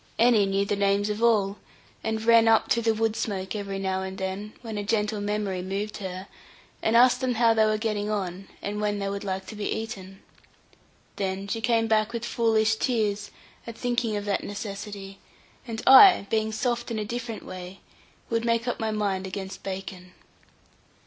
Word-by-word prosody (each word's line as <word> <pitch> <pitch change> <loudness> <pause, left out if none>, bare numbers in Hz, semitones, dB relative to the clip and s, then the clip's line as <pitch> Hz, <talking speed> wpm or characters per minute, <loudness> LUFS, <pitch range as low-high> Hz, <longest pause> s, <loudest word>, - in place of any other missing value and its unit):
Annie 225 -4 +4
knew 195 +1 +1
the 205 - 0
names 200 +1 +1
of 210 +2 -4
all, 210 -4 +2 0.4
and 220 0 -2
ran 230 -1 +6
up 225 0 +4
through 235 - +3
the 225 -1 +2
wood 225 0 0
smoke, 200 -3 -3
every 200 -2 -4
now 190 -1 -1
and 190 0 -5
then, 190 +3 -4
when 225 -2 -6
a - - -3
gentle 210 0 0
memory 205 -2 -2
moved 200 +3 -4
her, 190 -1 -6 0.5
and 225 +1 +3
asked 250 +1 +5
them 255 -2 0
how 230 0 +4
they 220 -1 +4
were 215 0 +1
getting 215 -2 -2
on, 195 -2 -3 0.2
and 210 +1 -3
when 205 -1 0
they 200 -1 -2
would 200 +1 -4
like 190 -1 -3
to 215 - -9
be 205 -1 -3
eaten. 195 -4 -5 1.0
Then 195 0 -2
she 225 +2 -3
came 230 -1 +2
back 220 0 +1
with 235 0 -3
foolish 220 -2 +2
tears, 210 -5 0 0.4
at 230 - -7
thinking 240 -3 0
of 205 - -4
that 200 -1 -1
necessity; 200 -1 -7 0.5
and 225 -1 -5
I, 360 - +9
being 220 -1 +1
soft 240 +2 -1
in 230 - -3
a 215 - -2
different 235 0 -5
way, 185 +1 -9 0.5
would 230 0 -1
make 230 0 +1
up 245 - -2
my 220 - -1
mind 200 -3 -1
against 190 0 -6
bacon. 190 -1 -7
210 Hz, 190 wpm, -26 LUFS, 195-225 Hz, 1.0 s, I